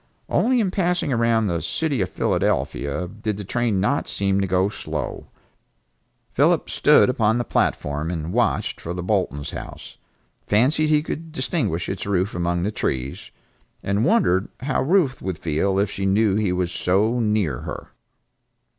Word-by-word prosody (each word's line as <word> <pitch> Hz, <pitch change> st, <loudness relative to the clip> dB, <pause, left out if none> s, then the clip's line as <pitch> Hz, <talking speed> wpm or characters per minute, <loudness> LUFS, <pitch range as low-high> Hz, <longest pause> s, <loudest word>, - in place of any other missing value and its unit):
Only 250 Hz, +1 st, +2 dB
in 200 Hz, -5 st, +1 dB
passing 180 Hz, -6 st, 0 dB
around 115 Hz, -1 st, +2 dB
the 85 Hz, -4 st, -1 dB
city 135 Hz, -, -1 dB
of 95 Hz, -, -1 dB
Philadelphia 70 Hz, +5 st, -1 dB
did 110 Hz, +1 st, -4 dB
the 105 Hz, -, -5 dB
train 115 Hz, 0 st, 0 dB
not 105 Hz, +9 st, 0 dB
seem 100 Hz, 0 st, 0 dB
to 95 Hz, -, 0 dB
go 95 Hz, +1 st, +2 dB
slow. 105 Hz, -, -5 dB, 1.0 s
Philip -, -, +2 dB
stood -, -, +5 dB
upon 115 Hz, -3 st, +2 dB
the 120 Hz, -, 0 dB
platform 75 Hz, -7 st, -1 dB
and 85 Hz, 0 st, -4 dB
watched 120 Hz, +1 st, 0 dB
for 85 Hz, +1 st, -5 dB
the 90 Hz, -, -4 dB
Boltons' 90 Hz, -7 st, -1 dB
house, -, -, -9 dB, 0.5 s
fancied 135 Hz, +9 st, +3 dB
he 150 Hz, -1 st, +3 dB
could 160 Hz, 0 st, -6 dB
distinguish 120 Hz, -, -1 dB
its 95 Hz, -, -4 dB
roof 95 Hz, 0 st, 0 dB
among 85 Hz, 0 st, -1 dB
the 105 Hz, -, 0 dB
trees, 65 Hz, -9 st, -3 dB, 0.5 s
and 100 Hz, +2 st, 0 dB
wondered 100 Hz, -, +2 dB
how 135 Hz, +1 st, 0 dB
Ruth 150 Hz, -4 st, +2 dB
would 95 Hz, -3 st, -3 dB
feel 85 Hz, +5 st, 0 dB
if 100 Hz, 0 st, +1 dB
she 95 Hz, 0 st, -2 dB
knew 100 Hz, +1 st, +3 dB
he 105 Hz, -3 st, +1 dB
was 90 Hz, -1 st, -1 dB
so 105 Hz, +9 st, +1 dB
near 105 Hz, -, 0 dB
her. -, -, -7 dB
100 Hz, 160 wpm, -23 LUFS, 90-120 Hz, 1.0 s, stood